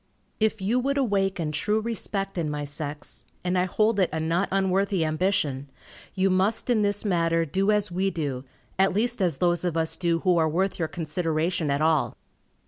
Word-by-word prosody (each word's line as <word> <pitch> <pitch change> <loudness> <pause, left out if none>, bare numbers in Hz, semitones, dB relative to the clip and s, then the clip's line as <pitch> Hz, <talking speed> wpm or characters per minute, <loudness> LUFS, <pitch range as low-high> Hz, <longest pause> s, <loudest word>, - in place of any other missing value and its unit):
If 220 -2 +1
you 230 +6 +2
would 275 +3 0
awaken 195 - 0
true 210 +9 0
respect 210 -3 -3
in 165 -4 -1
my 150 0 -3
sex, 145 -5 -5 0.2
and 180 +1 0
I 180 0 +2
hold 215 +3 +1
it 185 - +3
a 160 - -2
not 165 +4 0
unworthy 190 -2 +1
ambition, 155 -4 0 0.5
you 190 0 +2
must 195 +6 +1
in 225 -3 +3
this 205 +1 0
matter 165 -3 +2
do 195 +6 0
as 210 -2 +2
we 190 +2 0
do, 145 -8 -3 0.4
at 195 -1 +4
least 240 +1 0
as 170 -7 +1
those 175 +1 +1
of 175 -2 -1
us 160 0 0
do 170 -1 0
who 180 -2 +3
are 160 -1 +2
worth 185 +5 -1
your 160 - 0
consideration 165 0 -1
at 140 +1 0
all. 155 -2 +1
180 Hz, 190 wpm, -26 LUFS, 160-200 Hz, 0.5 s, at